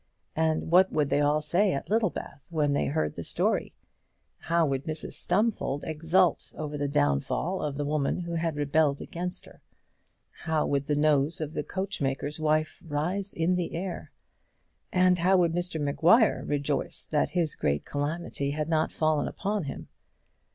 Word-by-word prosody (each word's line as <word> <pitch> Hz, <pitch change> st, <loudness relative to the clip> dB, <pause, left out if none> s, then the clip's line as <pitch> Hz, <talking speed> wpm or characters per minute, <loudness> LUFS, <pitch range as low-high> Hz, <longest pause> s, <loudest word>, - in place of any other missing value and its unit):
And 160 Hz, 0 st, 0 dB
what 185 Hz, +2 st, +6 dB
would 150 Hz, -2 st, +1 dB
they 145 Hz, -, +2 dB
all 145 Hz, +1 st, +2 dB
say 180 Hz, +7 st, +2 dB
at 140 Hz, -, -4 dB
Littlebath 210 Hz, -10 st, -1 dB
when 150 Hz, -4 st, +1 dB
they 140 Hz, -, +1 dB
heard 155 Hz, +2 st, -1 dB
the 85 Hz, -, -6 dB
story? -, -, 0 dB, 0.6 s
How 170 Hz, 0 st, +2 dB
would 135 Hz, -2 st, -2 dB
Mrs 155 Hz, 0 st, -4 dB
Stumfold 185 Hz, -7 st, 0 dB
exult 165 Hz, +2 st, +1 dB
over 150 Hz, -1 st, -5 dB
the 145 Hz, -1 st, -1 dB
downfall 75 Hz, -, 0 dB
of 145 Hz, -2 st, -2 dB
the 145 Hz, -, -1 dB
woman 150 Hz, +3 st, 0 dB
who 170 Hz, -1 st, -5 dB
had 165 Hz, -1 st, -1 dB
rebelled 145 Hz, 0 st, +2 dB
against 180 Hz, +1 st, -5 dB
her! -, -, -17 dB, 0.8 s
how 160 Hz, -2 st, +1 dB
would 140 Hz, 0 st, -1 dB
the 150 Hz, -, +1 dB
nose 150 Hz, +1 st, +2 dB
of 155 Hz, -1 st, -4 dB
the -, -, -1 dB
coachmaker's 150 Hz, -7 st, -3 dB
wife 155 Hz, 0 st, 0 dB
rise 175 Hz, +6 st, -2 dB
in 165 Hz, +2 st, +1 dB
the 180 Hz, -2 st, -2 dB
air! 180 Hz, +1 st, -5 dB, 0.8 s
and 180 Hz, -1 st, +4 dB
how 185 Hz, +3 st, +4 dB
would 170 Hz, -2 st, +2 dB
Mr 175 Hz, -2 st, -2 dB
Maguire 170 Hz, -, +4 dB
rejoice 145 Hz, 0 st, -1 dB
that 150 Hz, -2 st, 0 dB
this 165 Hz, -4 st, +1 dB
great 70 Hz, 0 st, -1 dB
calamity 145 Hz, 0 st, -3 dB
had 150 Hz, +2 st, -2 dB
not 160 Hz, -1 st, +1 dB
fallen 155 Hz, -2 st, +1 dB
upon 200 Hz, -3 st, -2 dB
him! 135 Hz, -, -6 dB
155 Hz, 165 wpm, -28 LUFS, 145-175 Hz, 0.8 s, what